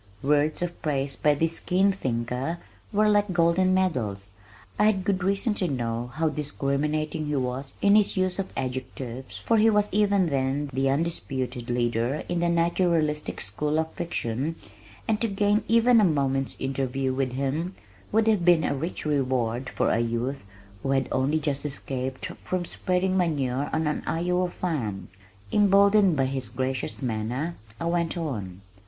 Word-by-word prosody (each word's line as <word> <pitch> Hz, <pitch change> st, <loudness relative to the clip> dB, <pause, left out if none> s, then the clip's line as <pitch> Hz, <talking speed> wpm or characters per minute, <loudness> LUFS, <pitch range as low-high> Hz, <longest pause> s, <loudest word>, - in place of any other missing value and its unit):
Words 150 Hz, +3 st, +2 dB
of 175 Hz, -1 st, -5 dB
praise 140 Hz, -3 st, 0 dB
by 150 Hz, -1 st, +3 dB
this 165 Hz, +2 st, 0 dB
keen 190 Hz, +2 st, +2 dB
thinker 125 Hz, -1 st, -2 dB, 0.3 s
were 215 Hz, 0 st, +3 dB
like 205 Hz, -1 st, +3 dB
golden 175 Hz, +2 st, +3 dB
medals. 115 Hz, -, 0 dB, 0.5 s
I 210 Hz, -, +5 dB
had 205 Hz, -3 st, +3 dB
good 190 Hz, -2 st, 0 dB
reason 200 Hz, +4 st, +1 dB
to 190 Hz, -3 st, -1 dB
know 120 Hz, -4 st, -2 dB
how 160 Hz, +1 st, +1 dB
discriminating 150 Hz, +1 st, -1 dB
he 150 Hz, -, -1 dB
was 130 Hz, +1 st, -3 dB
in 200 Hz, -, +6 dB
his 210 Hz, -2 st, +4 dB
use 185 Hz, 0 st, 0 dB
of 195 Hz, -, -3 dB
adjectives 130 Hz, -1 st, -5 dB
for 225 Hz, -1 st, +2 dB
he 220 Hz, +1 st, +6 dB
was 210 Hz, -2 st, +2 dB
even 200 Hz, -2 st, +3 dB
then 135 Hz, +1 st, -1 dB
the 135 Hz, +1 st, +1 dB
undisputed 135 Hz, -5 st, -2 dB
leader 120 Hz, +3 st, 0 dB
in 175 Hz, -1 st, -1 dB
the 170 Hz, 0 st, +1 dB
naturalistic 170 Hz, -3 st, +1 dB
school 150 Hz, +10 st, -1 dB
of 160 Hz, 0 st, -1 dB
fiction 145 Hz, -2 st, -2 dB, 0.5 s
and 215 Hz, -1 st, +1 dB
to 230 Hz, -, +2 dB
gain 205 Hz, +1 st, +1 dB
even 230 Hz, 0 st, +5 dB
a -, -, +4 dB
moment's 135 Hz, -6 st, +1 dB
interview 135 Hz, 0 st, -1 dB
with 130 Hz, -1 st, -1 dB
him 145 Hz, +8 st, -2 dB, 0.4 s
would 220 Hz, +1 st, +3 dB
have 215 Hz, -5 st, +3 dB
been 170 Hz, -2 st, +5 dB
a -, -, +1 dB
rich 155 Hz, +6 st, -4 dB
reward 130 Hz, -4 st, 0 dB
for -, -, 0 dB
a -, -, +2 dB
youth 120 Hz, +3 st, -2 dB, 0.4 s
who 135 Hz, -, -3 dB
had 135 Hz, -2 st, +1 dB
only 135 Hz, +4 st, +1 dB
just 145 Hz, -2 st, -2 dB
escaped 135 Hz, -2 st, -4 dB, 0.2 s
from 185 Hz, -1 st, -2 dB
spreading 185 Hz, +2 st, 0 dB
manure 145 Hz, -6 st, 0 dB
on 160 Hz, 0 st, 0 dB
an 150 Hz, -, -1 dB
Iowa 180 Hz, +2 st, 0 dB
farm. 130 Hz, -, -3 dB, 0.4 s
Emboldened 200 Hz, -3 st, +5 dB
by 135 Hz, -, +3 dB
his 130 Hz, -1 st, -3 dB
gracious 130 Hz, +1 st, -3 dB
manner, 125 Hz, +8 st, -2 dB, 0.2 s
I -, -, -3 dB
went 170 Hz, 0 st, 0 dB
on. 105 Hz, -, -4 dB
150 Hz, 160 wpm, -26 LUFS, 130-180 Hz, 0.5 s, in